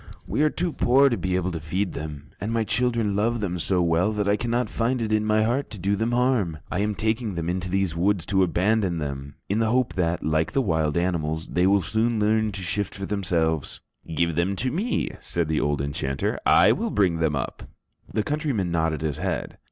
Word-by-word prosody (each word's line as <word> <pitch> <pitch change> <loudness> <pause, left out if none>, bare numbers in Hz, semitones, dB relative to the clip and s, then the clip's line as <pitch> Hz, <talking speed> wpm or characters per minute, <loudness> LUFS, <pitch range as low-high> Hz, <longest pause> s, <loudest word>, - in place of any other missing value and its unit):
"We - - -1
are 155 - +4
too 170 +1 -2
poor 135 +3 +4
to 120 - 0
be 95 -4 -1
able 90 0 0
to 85 - -4
feed 90 +5 -2
them, 75 -3 -7
and 105 +3 -2
my 115 -1 +1
children 115 -3 0
love 115 +3 +1
them 90 -4 -2
so 90 +1 +2
well 85 +5 +2
that 105 -1 -1
I 100 - +4
cannot 120 +2 -1
find 120 +3 -1
it 110 -2 -2
in 110 0 +2
my 110 0 +2
heart 120 +5 0
to 105 - -8
do 100 +2 0
them 110 +3 -1
harm. 120 -10 +1
I 90 - -1
am 105 0 0
taking 110 -1 -1
them 85 -1 -3
into 90 0 -3
these 95 -2 0
woods 95 +1 +1
to 95 -2 +2
abandon 95 +1 +1
them, 70 -2 -5
in 100 +3 0
the 110 -1 +2
hope 125 +1 +1
that, 85 -2 -1
like 80 +1 0
the - - +2
wild 80 -5 0
animals, 80 -2 -1
they 90 +1 +2
will 100 0 +4
soon 110 +5 0
learn 110 +1 +2
to 95 -1 -5
shift 100 +3 -2
for 95 - -5
themselves." 85 -7 -1 0.4
"Give 85 0 +1
them 90 +3 +1
to 125 +6 -2
me," 210 - -1
said 85 -2 -1
the 80 -1 0
old 75 -2 0
enchanter, 70 -1 -2
"I - - +6
will - - 0
bring 95 -5 +2
them 80 -3 +1
up." 70 - -5 0.4
The 110 - 0
countryman 140 - -1
nodded 80 -2 0
his 75 -2 -2
head. 90 -3 -3
95 Hz, 220 wpm, -25 LUFS, 85-110 Hz, 0.4 s, I